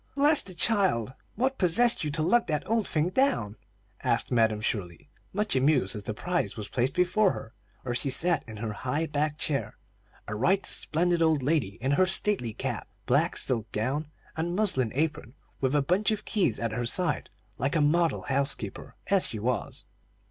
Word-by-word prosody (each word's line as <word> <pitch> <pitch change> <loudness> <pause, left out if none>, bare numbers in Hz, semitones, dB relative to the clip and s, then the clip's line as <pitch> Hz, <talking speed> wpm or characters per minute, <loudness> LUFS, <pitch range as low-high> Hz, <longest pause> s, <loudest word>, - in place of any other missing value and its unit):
"Bless 290 +2 +5
the 185 - -7
child! 180 - +1 0.2
What 260 +4 -1
possessed 220 +5 +4
you 150 - -1
to 155 +2 0
lug 235 +8 +3
that 150 -3 -2
old 225 -1 +1
thing 155 +2 0
down?" 185 - +1 0.5
asked - - +1
Madam 110 -3 +2
Shirley, 95 -6 -4 0.2
much 210 -2 -1
amused 130 -7 +2
as 105 -1 -7
the 110 - -2
prize 155 - -2
was 105 -2 -6
placed 130 +2 -1
before 180 +3 +3
her, 115 - -9 0.3
where 120 - -3
she 130 +3 -1
sat 160 +4 +1
in 110 - -8
her 110 0 -4
high 135 +9 -2
backed 150 0 -1
chair, 145 -4 -2 0.5
a 105 - -4
right 185 - +1
splendid 175 +1 +2
old 160 -4 +2
lady 135 -9 0
in 135 - +1
her 185 +6 +3
stately 190 - +1
cap, - - -4 0.2
black - - +2
silk 115 -3 -1
gown, 135 +8 -2 0.3
and 170 +2 -2
muslin 180 - +2
apron, 150 -4 -2 0.2
with 135 +1 0
a 145 - +3
bunch 185 +9 +1
of 215 -1 -2
keys 190 - 0
at 115 -1 -2
her 120 +1 -2
side, 175 +4 0 0.3
like 135 +4 -1
a - - +3
model 165 +3 +2
housekeeper, 135 -6 -3
as 195 0 +2
she 115 - -5
was. 120 +4 -3
150 Hz, 185 wpm, -27 LUFS, 120-180 Hz, 0.5 s, Bless